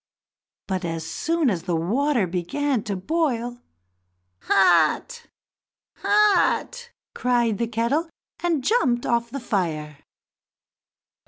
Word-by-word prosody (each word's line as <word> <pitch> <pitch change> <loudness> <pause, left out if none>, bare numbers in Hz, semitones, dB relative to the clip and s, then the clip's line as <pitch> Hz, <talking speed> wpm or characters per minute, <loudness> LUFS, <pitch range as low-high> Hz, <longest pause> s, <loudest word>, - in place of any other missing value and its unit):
But, 190 -1 -3
as 165 -1 -4
soon 325 - 0
as 175 -4 -2
the 175 - -2
water 235 - +1
began 200 +10 -1
to 200 - -2
boil, 245 - -2 0.8
"Hot! 190 - +3 0.7
hot!" 425 +3 +2 0.2
cried 240 -3 +1
the 235 - 0
kettle, 235 +9 -1 0.3
and 335 -6 0
jumped 250 - +1
off 235 0 0
the 275 +4 -5
fire. 160 - -3
235 Hz, 100 wpm, -23 LUFS, 185-295 Hz, 0.8 s, Hot